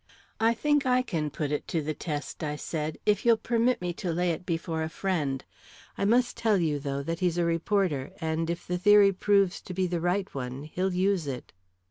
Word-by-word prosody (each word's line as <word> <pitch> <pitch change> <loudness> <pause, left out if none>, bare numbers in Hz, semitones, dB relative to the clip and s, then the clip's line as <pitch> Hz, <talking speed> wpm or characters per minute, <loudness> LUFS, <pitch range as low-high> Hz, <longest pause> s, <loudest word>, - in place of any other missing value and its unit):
"I 225 +1 +3
think 295 +3 +2
I 255 0 +3
can 160 -10 -2
put 145 0 -3
it 150 - -2
to 165 - 0
the 155 0 -2
test," 150 +1 -5
I 150 -1 -2
said, 155 0 -4
"if 205 -1 +2
you'll 235 -1 +5
permit 235 +1 +1
me 175 -1 -1
to 180 -4 -1
lay 175 +1 +1
it 170 +2 -5
before 165 -1 -2
a 160 - -2
friend. 155 -8 -2 0.5
I 200 - -1
must 240 +4 +3
tell 220 -3 +2
you, 155 -5 0
though, 140 0 -3
that 165 +3 -3
he's 175 -2 +1
a 175 - +2
reporter, 170 -4 0
and 160 +1 -1
if 170 0 -3
the 180 0 -2
theory 205 +1 +6
proves 195 -1 +2
to 180 - -8
be 190 0 +1
the 175 -2 -2
right 185 +3 0
one, 130 0 -5
he'll 185 +5 -2
use 185 -3 +1
it." 130 -3 -6
175 Hz, 215 wpm, -28 LUFS, 155-200 Hz, 0.5 s, theory